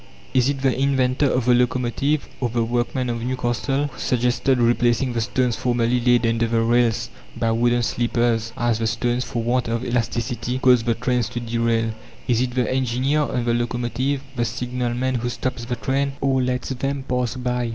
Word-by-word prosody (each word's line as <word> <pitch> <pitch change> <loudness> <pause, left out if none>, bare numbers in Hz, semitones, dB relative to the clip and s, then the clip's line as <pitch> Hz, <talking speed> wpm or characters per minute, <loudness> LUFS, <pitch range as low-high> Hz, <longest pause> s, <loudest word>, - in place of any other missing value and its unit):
Is 130 +1 +3
it 140 -2 -2
the 135 -2 +3
inventor 135 0 +2
of 125 -2 0
the 125 - +5
locomotive, 125 +4 +1
or 125 - 0
the 115 0 0
workman 120 +2 -1
of 120 -1 -2
Newcastle, 130 +3 -1
who 145 - -8
suggested 125 +2 +1
replacing 120 +1 +2
the 115 - 0
stones 125 +1 0
formerly 120 0 +1
laid 120 0 +3
under 115 0 +1
the 115 0 +1
rails 115 0 +2 0.3
by 115 -1 +1
wooden 120 +1 +2
sleepers, 115 -1 0
as 120 -2 +1
the 115 - 0
stones, 120 +2 0
for 120 -2 -3
want 120 +1 0
of 115 +2 -2
elasticity, 120 +1 -1
caused 125 -3 +4
the 115 - +2
trains 125 -1 0
to 120 - -4
derail? 115 -1 0 0.4
Is 120 -1 +2
it 125 -1 -2
the 125 -3 +1
engineer 130 +3 +1
on 125 -4 -1
the 120 - +2
locomotive? 120 +3 -1
The 120 - 0
signalman 125 +2 -2
who 120 - -1
stops 120 -1 -3
the 120 0 -2
trains, 135 +2 -1
or 135 -1 +1
lets 125 0 -1
them 135 +1 -2
pass 125 -1 -1
by? 125 -1 -1
120 Hz, 185 wpm, -22 LUFS, 120-130 Hz, 0.4 s, the